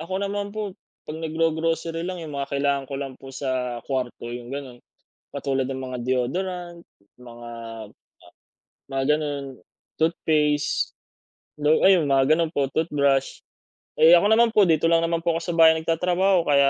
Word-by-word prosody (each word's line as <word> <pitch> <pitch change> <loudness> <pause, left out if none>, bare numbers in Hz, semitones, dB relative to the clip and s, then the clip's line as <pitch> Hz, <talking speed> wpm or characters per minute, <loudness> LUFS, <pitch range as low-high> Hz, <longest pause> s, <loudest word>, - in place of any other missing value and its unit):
Ako 185 +4 -4
naman 200 0 -3
po, 210 -3 -5 0.3
'pag 155 - -5
naggo-grocery 165 +1 -1
lang, 180 -1 -4
yung 150 -3 -7
mga 140 0 -4
kailangan 140 0 0
ko 135 - -7
lang 135 -1 -5
po 135 0 -12
sa 130 -3 -3
kuwarto, 125 -3 -3
yung 120 +1 -7
gano'n. 135 -3 -6 0.5
Katulad 135 -2 -2
ng 130 -1 -4
mga 130 -1 -5
deodorant, 170 +8 -2 0.4
mga 120 -1 -11 1.4
mga 135 0 0
gano'n. 145 -2 -4 0.5
Toothpaste, 155 -2 +1 0.7
lo 150 +1 +2
ayun 185 -5 +5
mga 135 +1 +3
gano'n 165 -2 0
po, 140 -2 0
toothbrush. 140 -4 0 0.6
Eh, 165 +2 +8
ako 205 +5 +3
naman 230 0 +4
po 210 - +6
dito 160 0 +3
lang 165 0 +3
naman 165 0 0
po 170 -1 +2
ako 165 - -2
sa 175 - -3
bahay 160 0 +8
nagtatrabaho. 180 +2 +1
Kaya 140 -1 +5
155 Hz, 155 wpm, -24 LUFS, 135-170 Hz, 1.4 s, Eh